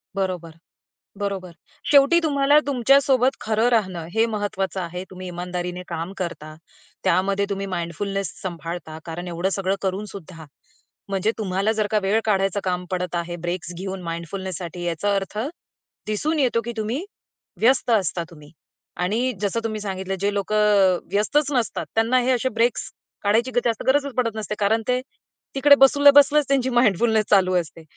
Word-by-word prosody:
बरोबर. 185 -4 -2 0.7
बरोबर. 195 -3 -3 0.4
शेवटी 285 +4 +6
तुम्हाला 285 0 +4
तुमच्यासोबत 265 0 +4
खरं 220 +2 +1
राहणं, 190 -8 0
हे 225 +1 +3
महत्त्वाचं 205 -3 -2
आहे. 180 +1 -5
तुम्ही 185 0 -8
इमानदारीने 180 0 -4
काम 170 +2 -5
करता, 155 -4 -5 0.5
त्यामध्ये 195 +2 +2
तुम्ही 195 0 -2
माइंडफुलनेस 190 +3 -3
सांभाळता, 170 -3 -6
कारण 170 +2 -6
एवढं 175 +2 -1
सगळं 195 0 0
करून 195 +2 -2
सुद्धा, 165 -4 -10 0.6
म्हणजे 195 +2 +1
तुम्हाला 200 +1 0
जर 215 -1 0
का 215 - +3
वेळ 205 +3 +2
काढायचं 195 -1 +1
काम 180 -1 -2
पडत 180 -1 -2
आहे, 175 0 -3
ब्रेक्स 175 0 -3
घेऊन 190 0 -5
माइंडफुलनेससाठी 175 +1 -5
याचा 175 +5 0
अर्थ 195 +1 -3 0.7
दिसून 300 +10 -1
येतो, 240 -4 +2
की 235 +1 -5
तुम्ही, 230 - -2 0.6
व्यस्त 255 +2 +3
असता 185 -5 +1
तुम्ही. 150 -3 -15 0.5
आणि 220 +8 0
जसं 205 +2 0
तुम्ही 215 -1 -3
सांगितलं, 190 -1 -3
जे 200 0 +1
लोकं 200 +1 -1 0.4
अ, - - -9
व्यस्तच 285 +8 +1
नसतात, 245 -5 -1
त्यांना 225 +3 +3
हे 255 - +1
असे 255 +1 +1
ब्रेक्स 230 +1 0 0.3
काढायची 225 +5 +2
जास्त 230 -2 0
गरजच 280 0 +2
पडत 230 -3 0
नसते, 210 -1 -4
कारण 220 +3 +2
ते 250 0 +1 0.5
तिकडे 285 +1 +7
बसल्या, 285 +1 +7
बसल्याच 290 +1 +6
त्यांची 265 -2 +1
माइंडफुलनेस 220 -2 +3
चालू 190 -2 +4
असते. 165 -2 -3
200 Hz, 150 wpm, -23 LUFS, 180-235 Hz, 0.7 s, तिकडे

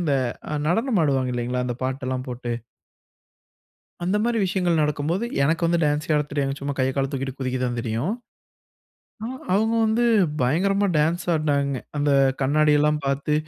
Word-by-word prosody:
இந்த 150 -5 +1 0.5
நடனம் 225 - +1
ஆடுவாங்க 130 -3 +1
இல்லீங்களா! 125 +1 -1
இந்த 120 -1 -3
பாட்டெல்லாம் 130 0 -3
போட்டு 120 -1 -4 1.5
அந்த 185 +4 +1
மாரி 235 0 +1
விஷயங்கள் 180 -3 +1
நடக்கும்போது, 150 +7 0 0.2
எனக்கு 160 +4 +1
வந்து 170 0 +2
டான்ஸே 150 +2 0
ஆடத் 150 0 0
தெரியாது, 140 -2 0
சும்மா 140 0 -3
கைய 130 0 +2
கால 135 -1 0
தூக்கிட்டு 135 -1 -4
குதிக்கத்தான் 125 -2 -1
தெரியும். 115 - -1 1.1
அ 225 - -3 0.3
அவுங்க 220 +3 +2
வந்து 220 +2 +2 0.4
பயங்கரமா 195 +10 +2
டான்ஸ் 165 +4 +1
ஆடுனாங்க. 140 -3 0 0.2
அந்த 145 0 +1 0.3
கண்ணாடியெல்லாம் 150 +2 +3
பாத்து, 140 +2 0
145 Hz, 140 wpm, -23 LUFS, 130-170 Hz, 1.5 s, கண்ணாடியெல்லாம்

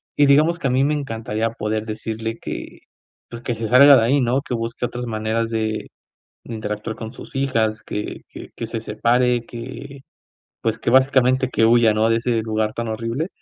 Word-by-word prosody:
y 145 - +5
digamos 155 +4 +4
que 170 - -8
a - - +1
mí 130 +2 +3
me 150 +2 +1
encantaría 115 -5 -3
poder 110 -1 -3
decirle 110 +1 -5
que, - - -7 0.5
pues, 115 - -8
que 120 - -1
se 110 0 -3
salga 140 +4 +8
de - - +3
ahí, 135 +5 +3
¿no?, 125 +2 +1
que 130 -3 -4
busque 115 +1 -3
otras 120 +1 -5
maneras 110 0 -1
de 110 -1 -2 0.6
de 120 - -6
interactuar 105 0 -4
con 110 -1 -7
sus 130 - -12
hijas, 115 -5 0
que 105 - -5
que - - -11
que 115 - -5
se 115 0 -4
separe, 120 +2 +1
que, 135 +4 -9 0.6
pues, - - -1
que - - -1
básicamente 130 0 +4
que 115 - +1
huya, 115 -1 +5
¿no?, 110 +1 +2
de 115 - +3
ese 115 -1 0
lugar 110 -1 -1
tan 115 0 -4
horrible. 115 +8 -3
115 Hz, 195 wpm, -21 LUFS, 110-130 Hz, 0.6 s, salga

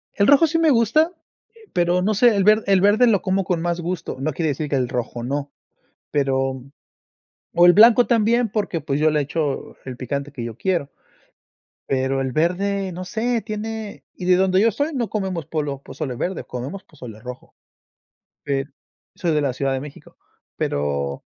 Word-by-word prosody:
El 200 - +3
rojo 285 +3 +6
sí 315 - 0
me 325 -1 +4
gusta, 275 - +3 0.4
eh, 455 -2 -20
pero 175 0 +2
no 210 +4 +1
sé, 230 +2 +4
el 200 - +2
ver 215 +2 +5
el 195 -2 +4
verde 210 +5 +5
lo 205 -5 +3
como 195 0 0
con 175 -2 -1
más 175 0 -1
gusto, 175 -3 -4
no 155 +4 -1
quiere 160 +2 -1
decir 150 +1 -3
que 140 - 0
el 125 -2 0
rojo 120 -1 -4
no, 140 +3 -3 0.6
pero 135 -2 0 0.9
o 175 +1 +6
el 175 - +8
blanco 230 +4 +7
también, 235 0 +2
porque, 200 -5 -2
pues, 140 -1 -2
yo 155 +1 +4
le 150 -1 +1
echo 145 0 -3
el 130 -2 -7
picante 140 +3 -4
que 125 -5 -6
yo 115 -2 -6
quiero. 175 -3 -1 1.0
Pero 135 0 0
el 135 -1 -1
verde, 190 +5 0
no 180 +2 -6
sé, 230 +4 -1
tiene 215 0 -6
y 180 - -7
de 180 0 +4
donde 190 0 +3
yo 225 - +5
estoy 290 +8 -1
no 245 -6 -2
comemos 190 -7 -3
polo 145 -3 -3
pozole 135 -5 -5
verde, 180 +7 -3
comemos 130 +10 -6
pozole 125 -8 -11
rojo. 125 +2 -10 0.9
Pero 140 0 -2 0.5
soy 170 -2 0
de 150 - +2
la 140 -3 0
Ciudad 135 +2 -1
de 135 - -2
México. 145 0 -12 0.4
Pero 70 -1 -2
175 Hz, 190 wpm, -22 LUFS, 135-210 Hz, 1.0 s, el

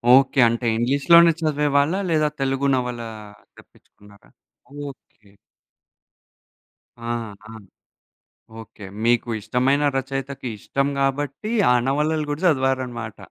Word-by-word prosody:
Okay. 135 0 +3
అంటే 120 +1 -3
ఇంగ్లీషులోనే 145 +8 +5
చదివేవాళ్ళా? 150 +3 +1
లేదా 155 -2 +2
తెలుగు 135 +1 0
నవల 125 -2 -3 0.6
తెప్పిచ్చుకున్నారా? 100 0 -20 0.6
ఓకే. 110 -6 -18 1.8
ఆహా! 110 -3 -6 1.1
ఓకే. 110 -2 -13 0.2
మీకు 120 0 +2
ఇష్టమైన 130 +6 +1
రచయితకి 135 0 -4
ఇష్టం 140 +6 -1
కాబట్టి 140 - -2 0.2
ఆ - - +5
నవలలు 150 +2 0
గూడా 145 +2 -3
చదివారనమాట. 130 -6 -1
135 Hz, 90 wpm, -22 LUFS, 120-145 Hz, 1.8 s, ఇంగ్లీషులోనే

